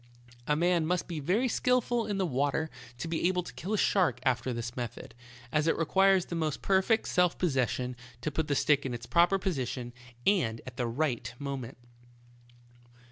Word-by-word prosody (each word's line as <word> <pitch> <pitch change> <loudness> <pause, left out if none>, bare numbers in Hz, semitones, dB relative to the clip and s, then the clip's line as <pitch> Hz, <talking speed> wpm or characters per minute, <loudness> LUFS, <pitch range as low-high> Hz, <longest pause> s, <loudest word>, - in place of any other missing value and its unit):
A 150 - +3
man 170 0 +2
must 180 0 0
be 170 -3 -4
very 195 - +1
skillful 245 -1 +1
in 205 -2 -1
the 190 - +1
water 145 +2 0 0.3
to 130 - -4
be 165 +1 +1
able 180 -1 0
to - - -9
kill 185 +6 -6
a - - 0
shark 175 - +2
after 130 0 +1
this 120 0 -4
method, 120 -3 -6 0.4
as 155 +1 +1
it - - +2
requires 190 +3 +3
the - - -7
most 155 -3 -2
perfect 195 +4 +2
self 180 -2 +2
posses 135 -9 +1
sion 125 0 -3 0.3
to 150 - -2
put 155 +1 -1
the 145 - +1
stick 145 0 +3
in 130 -3 -3
its 120 0 -7
proper 175 +7 +4
position, 130 - -3 0.3
and 125 - +2
at 130 - -9
the 120 - 0
right 120 -2 -1
moment. 135 -3 -5
155 Hz, 190 wpm, -30 LUFS, 130-180 Hz, 0.4 s, proper